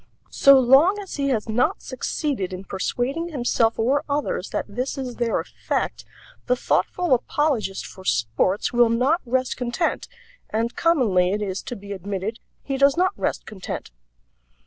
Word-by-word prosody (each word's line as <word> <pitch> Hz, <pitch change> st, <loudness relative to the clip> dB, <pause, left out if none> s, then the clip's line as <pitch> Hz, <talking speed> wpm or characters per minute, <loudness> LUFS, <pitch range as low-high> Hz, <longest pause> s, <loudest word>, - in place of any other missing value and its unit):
So 275 Hz, 0 st, +7 dB
long 275 Hz, +11 st, +5 dB
as 400 Hz, -5 st, -7 dB
he 280 Hz, -1 st, 0 dB
has 230 Hz, -5 st, 0 dB
not 225 Hz, +3 st, 0 dB
succeeded 255 Hz, -, -3 dB
in 185 Hz, +1 st, -6 dB
persuading 250 Hz, -, -2 dB
himself 240 Hz, -5 st, +1 dB
or 270 Hz, +6 st, +2 dB
others 285 Hz, +1 st, -1 dB
that -, -, -2 dB
this 255 Hz, +3 st, -3 dB
is 255 Hz, -3 st, -5 dB
their 235 Hz, -2 st, +1 dB
effect -, -, -3 dB, 0.4 s
the 250 Hz, -, +3 dB
thoughtful 350 Hz, +5 st, +1 dB
apologist 250 Hz, -5 st, 0 dB
for 190 Hz, -, -11 dB
sports 120 Hz, -, 0 dB
will 240 Hz, -1 st, +5 dB
not 260 Hz, +9 st, +2 dB
rest 255 Hz, +1 st, 0 dB
content, 250 Hz, +7 st, -1 dB, 0.4 s
and 230 Hz, +2 st, -1 dB
commonly, 210 Hz, -, +3 dB
it 210 Hz, -, -1 dB
is 195 Hz, -1 st, -3 dB
to 245 Hz, -, -6 dB
be 200 Hz, -1 st, -10 dB
admitted, 200 Hz, +3 st, -4 dB, 0.2 s
he 270 Hz, -, -2 dB
does 280 Hz, +2 st, +4 dB
not 370 Hz, +1 st, +3 dB
rest -, -, -2 dB
content. 190 Hz, -, -7 dB
245 Hz, 155 wpm, -23 LUFS, 205-275 Hz, 0.4 s, So